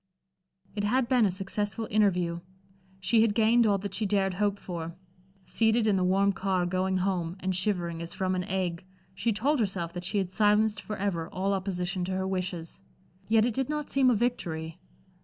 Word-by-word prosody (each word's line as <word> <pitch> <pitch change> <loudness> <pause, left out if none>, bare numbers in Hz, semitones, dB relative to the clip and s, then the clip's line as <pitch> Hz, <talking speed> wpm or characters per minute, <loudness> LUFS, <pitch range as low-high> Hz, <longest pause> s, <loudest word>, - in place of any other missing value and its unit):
It 205 - -2
had 240 +4 +2
been 245 -4 +4
a - - 0
successful 200 +3 -3
interview. 180 -5 +2 0.6
She 220 +4 +3
had 220 -2 +2
gained 230 +1 +4
all 200 -1 +3
that 200 +1 -6
she 215 - 0
dared 195 -1 +1
hope 205 +1 0
for. 170 -3 -6 0.5
Seated 225 0 +2
in 210 -2 +3
the 185 - +1
warm 195 +2 +3
car 190 -2 0
going 185 +1 0
home, 180 -2 -1
and 190 -1 -1
shivering 175 -3 -1
as 170 - -4
from 185 -1 -1
an 180 0 -1
ague, 185 -4 -2 0.3
she 230 +4 0
told 270 +8 +1
herself 185 -6 -1
that 175 - -5
she 200 +4 -2
had 190 -2 -1
silenced 210 +1 +2
forever 195 -6 -3
all 195 +2 0
opposition 185 -1 -2
to 190 - -3
her 190 0 -1
wishes. 180 -2 -4 0.5
Yet 220 0 +4
it 240 - 0
did 265 +3 -2
not 300 -1 -3
seem 270 -2 +4
a 245 - +4
victory. 175 -8 -2
195 Hz, 190 wpm, -28 LUFS, 180-215 Hz, 0.6 s, been